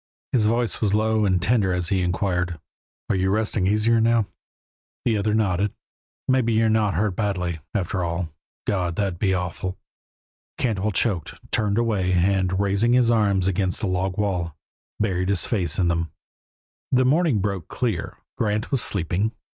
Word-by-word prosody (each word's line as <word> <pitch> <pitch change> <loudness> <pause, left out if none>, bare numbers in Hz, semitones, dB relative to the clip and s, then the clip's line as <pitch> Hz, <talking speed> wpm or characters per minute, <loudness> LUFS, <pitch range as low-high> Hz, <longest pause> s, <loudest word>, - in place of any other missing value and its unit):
His 110 -5 +3
voice 115 +1 0
was 105 -2 +2
low 110 0 +2
and 95 -1 +2
tender 100 0 +2
as 90 -1 -1
he 95 -2 +1
inquired, 90 -1 -1 0.5
"Are - - +1
you 95 0 +1
resting 105 -2 +1
easier 110 +3 +3
now?" 115 -1 +3 0.8
The 115 - +2
other 105 +1 +1
nodded. 100 -2 +1 0.5
"Maybe 130 -3 +2
you're 110 0 +3
not 110 -2 +2
hurt 100 +1 0
badly, 90 -5 -1 0.2
after 95 -2 -1
all. 85 0 -2 0.4
God! 90 -4 -1
That 105 - 0
would 85 - -12
be 95 -1 +2
awful 90 +1 -3 0.4
" - - -88
Cantwell 110 -3 0
choked, 95 -4 0 0.2
turned 105 -1 +1
away, 105 -6 +1
and, 95 +1 +2
raising 100 +4 +2
his 125 -2 +4
arms 100 -5 +2
against 95 -1 0
the 105 - 0
log 95 0 -1
wall, 90 -6 -1 0.4
buried 95 -3 0
his 100 -4 +3
face 90 - 0
in 90 - +2
them. 85 -1 0 0.8
The 130 0 +4
morning 150 -1 +3
broke 100 -4 -2
clear; 110 -10 -2 0.2
Grant 105 +2 -1
was 135 -4 +3
sleeping. 100 +4 0
100 Hz, 165 wpm, -24 LUFS, 90-110 Hz, 0.8 s, his